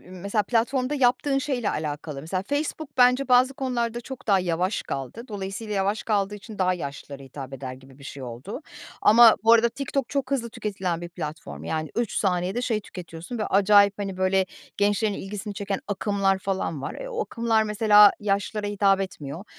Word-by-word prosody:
mesela, 195 +4 -2
platformda 255 +5 0
yaptığın 270 +1 +2
şeyle 260 -5 -1
alakalı. 150 -1 -4
Mesela, 185 +5 -3
Facebook 285 +3 -3
bence 250 +2 +4
bazı 255 +2 +5
konularda 240 -3 -2
çok 260 +1 -9
daha 195 -2 +4
yavaş 180 +3 -1
kaldı. 135 - -5
Dolayısıyla 205 +1 -5
yavaş 200 +2 0
kaldığı 205 -2 0
için 210 +1 -10
daha 185 -1 +2
yaşlılara 140 -3 -7
hitap 135 0 -9
eder 130 -1 -6
gibi 130 +1 -15
bir 140 - -14
şey 140 -1 -8
oldu. 125 - -7 0.4
Ama 230 +1 +8
bu 230 - +7
arada 235 0 +6
TikTok 275 +1 -3
çok 275 -2 -2
hızlı 240 -4 -1
tüketilen 190 -6 -3
bir 175 - -6
platform. 150 - -7
Yani, 155 - -3
3 235 -3 0
saniyede 185 +4 0
şey 225 -4 0
tüketiyorsun 175 +3 -8
ve 215 - -1
acayip, 200 +1 +5
hani, 195 -2 -4
böyle 185 0 +2 0.3
gençlerin 205 +1 +2
ilgisini 205 +1 -6
çeken 200 -1 -3
akımlar 200 -1 +1
falan 190 -7 -3
var. - - -4
E, - - -7
o 470 -2 -2
akımlar, 230 - +1
mesela, 210 -1 +6
yaşlılara 205 +1 -1
hitap 200 -1 +2
etmiyor. 165 -2 -6
205 Hz, 175 wpm, -25 LUFS, 180-235 Hz, 0.4 s, Ama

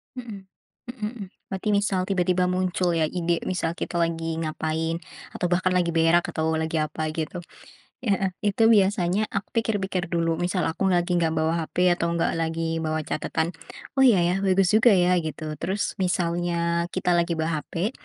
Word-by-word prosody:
Mmm. 210 -6 -8 0.4
Mmm 225 -3 -5
mmm. 195 - -6 0.2
Berarti 195 +2 -4
misal 200 -2 +1
tiba-tiba 180 -1 +2
muncul, 180 -1 0
ya, 160 - +3
ide, 170 0 -1
misal 170 -2 -2
kita - - -4
lagi 165 -1 -1
ngapain, 160 +1 -2 0.4
atau - - -2
bahkan 180 +1 +1
lagi 175 -2 +1
berak 165 +1 +4
atau 160 0 0
lagi 160 0 -1
apa, 155 +1 -3
gitu. 160 +2 -4 0.7
Heeh. 195 -4 +1
Itu 225 +2 +3
biasanya 195 0 +2
aku 200 +1 -4
pikir-pikir 195 -6 -1
dulu. 165 -1 0
Misal 180 0 0
aku 190 +4 0
lagi 175 -1 +2
nggak 165 -1 +1
bawa 160 +1 +1
hape 180 0 +2
atau 170 -1 0
nggak 165 - +1
lagi 165 0 -1
bawa 155 0 -2
catatan, 160 +3 -2 0.5
"Oh, - - +7
iya, 230 -8 +6
ya. 175 +2 +2
Bagus 190 -1 +3
juga, 220 -1 +6
ya." 180 0 +3
Gitu. 155 -1 -5
Terus, 195 +1 -1
misalnya 170 -1 0
kita 180 -1 -1
lagi 170 -1 +2
bawa 160 -1 -1
hape, 190 +8 -2
175 Hz, 170 wpm, -25 LUFS, 165-190 Hz, 0.7 s, Oh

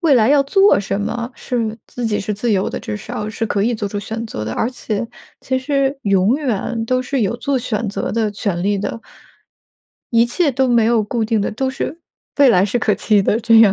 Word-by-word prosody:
未 325 -5 +4
来 225 -2 +4
要 285 0 +5
做 390 +8 +4
什 195 0 -2
么 235 +3 -3
是 230 -3 -3
自 245 - -6
己 215 -2 0
是 210 +2 -3
自 220 +3 0
由 195 -1 +1
的， - - -4
至 105 - -5
少 210 - -5
是 225 +1 -2
可 200 -1 0
以 235 +2 +1
做 210 -2 -3
出 205 +1 -4
选 225 +3 -5
择 110 - -5
的。 110 - -4
而 225 - 0
且 230 -3 -3 0.3
其 260 0 -1
实 275 +1 0
永 195 +2 +3
远 235 -4 -2
都 255 +2 +1
是 255 0 -1
有 210 +3 0
做 275 +1 -1
选 230 -3 -2
择 200 - -3
的 220 -2 0
权 200 -4 -2
利 205 +1 +1
的。 205 +3 -4 1.1
一 230 0 +5
切 290 +6 +1
都 265 0 +1
没 235 -2 +4
有 230 -1 +3
固 225 +1 -1
定 220 -1 +1
的， 200 - -1
都 260 +5 -1
是 265 +3 -4 0.4
未 280 -2 +7
来 190 -5 +5
是 210 +4 0
可 215 -3 +2
期 205 0 +2
的 210 - +1
这 225 -1 +6
样。 210 -4 +6
225 Hz, 250 characters per minute, -19 LUFS, 205-255 Hz, 1.1 s, 未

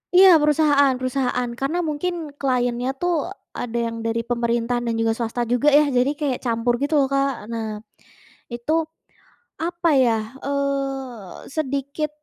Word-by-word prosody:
Iya. 380 +1 +9
Perusahaan 290 -2 +4
perusahaan. 255 -1 -1
Karena 280 +6 -1
mungkin 305 +5 -2 0.3
client-nya 245 -2 0
tuh 355 0 +1 0.5
ada 235 -1 -3
yang 230 0 -5
dari 230 0 0
pemerintahan 235 0 0
dan 230 - 0
juga 225 0 +2
swasta 235 +1 -2
juga 245 +4 +1
ya. - - +5
Jadi 250 +2 +3
kayak 280 -4 0
campur 235 0 +1
gitu 290 +2 -1
loh, 275 - +3
Kak. 275 0 +2 0.2
Nah, 225 -1 -3 0.9
itu 240 +5 -3 0.9
apa 345 0 0
ya, 235 - +3 0.3
eee, 275 -7 -3
sedikit, 280 0 -2
265 Hz, 135 wpm, -22 LUFS, 240-285 Hz, 0.9 s, Iya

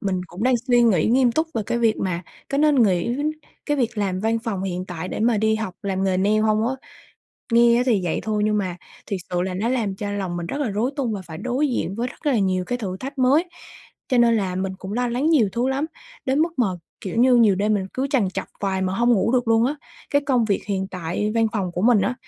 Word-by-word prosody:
mình 190 -3 -1
cũng 175 +5 -8
đang 255 +1 +3
suy 245 -1 +4
nghĩ 195 -9 +3
nghiêm 245 +1 +3
túc 315 +5 +1
về 225 - 0
cái 235 - 0
việc 225 -2 +2
mà 180 -2 -2 0.3
có 275 - +1
nên 295 -4 +4
nghỉ 200 +4 +1 0.5
cái 295 - +1
việc 235 -4 -1
làm 190 -2 -1
văn 225 +1 +1
phòng 195 -5 -2
hiện 185 -1 -3
tại 180 -1 -6
để - - -4
mà 230 0 +3
đi 220 +1 +2
học 220 -4 -4
làm 195 -1 -1
nghề 190 -1 +1
nail 205 +3 +2
hông 215 0 +2
á? 265 - -1 0.8
Nghe 235 0 +6
á 245 - +3
thì 225 -6 +3
vậy 170 - -1
thôi 215 -1 -1
nhưng 210 0 +2
mà 185 -3 -2 0.3
thiệt 195 -2 -3
sự 180 0 0
là 185 0 -3
nó 205 +5 -1
làm 230 -6 0
cho 205 0 -4
lòng 190 -4 -3
mình 170 -1 -4
rất 280 +11 -4
là 275 - 0
rối 220 +6 0
tung 255 -6 -1
và 200 -3 -4
phải 160 -1 -8
đối 250 - 0
diện 215 -6 -2
với 240 +3 -2
rất 300 - -14
là 265 -5 +3
nhiều 185 -2 +1
cái 245 +5 -3
thử 190 -6 -4
thách 270 +7 -7
mới. 270 +7 +4 0.6
Cho 255 - +2
nên 235 -1 +5
là 190 -4 -1
mình 190 +1 -2
cũng 195 +1 -7
lo 245 +1 0
lắng 260 +7 0
nhiều 260 -11 +4
thứ 240 +2 0
lắm, 270 +3 0 0.4
đến 265 +2 +1
mức 335 +2 +1
mà 245 - +4 0.3
kiểu 190 - -5
như 250 +1 +5
nhiều 220 -4 +5
đêm 210 +3 +1
mình 195 -2 -1
cứ 265 +2 0
trằn 245 -9 +2
trọc - - -4
hoài 190 -2 -1
mà 185 0 -1
hông 240 +4 +3
ngủ 230 +1 +2
được 245 -2 +1
luôn 225 0 +4
á. 280 - -1 0.4
Cái 285 0 +2
công 250 -5 +3
việc 205 -3 0
hiện 190 -2 -1
tại 185 +4 -2
văn 225 -1 +3
phòng 195 -5 -1
của 180 - -3
mình 230 -2 +5
á, 250 - 0
220 Hz, 265 wpm, -22 LUFS, 190-245 Hz, 0.8 s, Nghe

